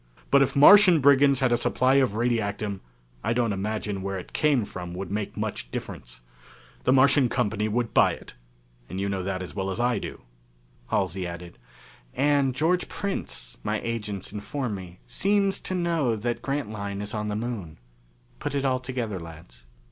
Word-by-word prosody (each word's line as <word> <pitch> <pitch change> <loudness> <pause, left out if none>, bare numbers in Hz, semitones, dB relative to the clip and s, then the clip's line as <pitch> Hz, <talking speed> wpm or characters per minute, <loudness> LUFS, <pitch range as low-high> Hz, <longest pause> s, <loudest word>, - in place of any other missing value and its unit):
But 140 - +6
if 135 - +1
Martian 180 +4 +8
Brigands 140 -1 +5
had 130 -2 +3
a 120 - +4
supply 130 +3 +2
of 130 -6 +2
radiactum 105 -4 -1 0.4
I 115 - +1
don't 115 -3 +1
imagine 105 0 -3
where 95 0 -3
it 90 - -9
came 145 -7 +2
from 90 -2 -7
would 95 +1 -5
make 105 0 -3
much - - -4
difference. - - -7 0.6
The - - +4
Martian 135 0 +5
company 105 0 0
would 115 +2 -1
buy - - +5
it, - - -11 0.6
and 95 - -5
you 100 - -1
know 100 -1 -2
that 95 0 -3
as 90 - -8
well 95 -1 -2
as 95 - -4
I 120 0 +1
do!" - - -8 0.7
Halsey 90 +1 -1
added, 85 0 -9 0.6
"And 140 -2 +2
George 170 +6 +1
Prince, - - -5
my - - -1
agents 105 -4 -4
inform 110 +3 -3
me, 90 -2 -9
seems 200 0 +1
to 185 - -4
know 165 -9 +1
that 120 +3 -3
Grantline 105 -8 -3
is 105 +1 -4
on 105 -1 -2
the 105 - -2
Moon. 105 -8 -5 0.6
Put 145 0 -3
it 140 -1 0
all 130 -1 +2
together, 125 -6 -4
lads. 80 -6 -12
115 Hz, 175 wpm, -26 LUFS, 100-135 Hz, 0.7 s, Martian